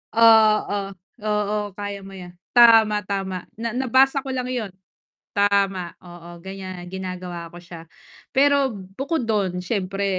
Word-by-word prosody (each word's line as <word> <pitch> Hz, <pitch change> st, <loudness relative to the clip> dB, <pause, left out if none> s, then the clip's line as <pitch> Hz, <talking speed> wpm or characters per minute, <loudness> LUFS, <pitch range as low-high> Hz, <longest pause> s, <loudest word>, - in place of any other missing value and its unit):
Oo. 220 Hz, -2 st, +5 dB, 0.5 s
Oo, 210 Hz, 0 st, 0 dB, 0.2 s
kaya 205 Hz, -1 st, -5 dB
mo 195 Hz, -, -11 dB
yan. 180 Hz, -2 st, -10 dB, 0.2 s
Tama, 225 Hz, -3 st, +7 dB
tama! 190 Hz, -2 st, -3 dB, 0.2 s
Na 230 Hz, -1 st, -2 dB
nabasa 265 Hz, +2 st, +3 dB
ko 270 Hz, -, -5 dB
lang 250 Hz, 0 st, -2 dB
yun. 220 Hz, -6 st, -3 dB, 0.6 s
Tama, 200 Hz, -3 st, +1 dB
oo 175 Hz, -1 st, -12 dB
ganyan, 185 Hz, -2 st, -7 dB
ginagawa 180 Hz, -2 st, -6 dB
ko 175 Hz, -, -13 dB
siya. 170 Hz, -2 st, -12 dB, 0.4 s
Pero 280 Hz, 0 st, +3 dB
bukod 230 Hz, -, -4 dB
dun 190 Hz, -5 st, -1 dB
siyempre, 195 Hz, -1 st, -2 dB
200 Hz, 130 wpm, -22 LUFS, 185-225 Hz, 0.6 s, Tama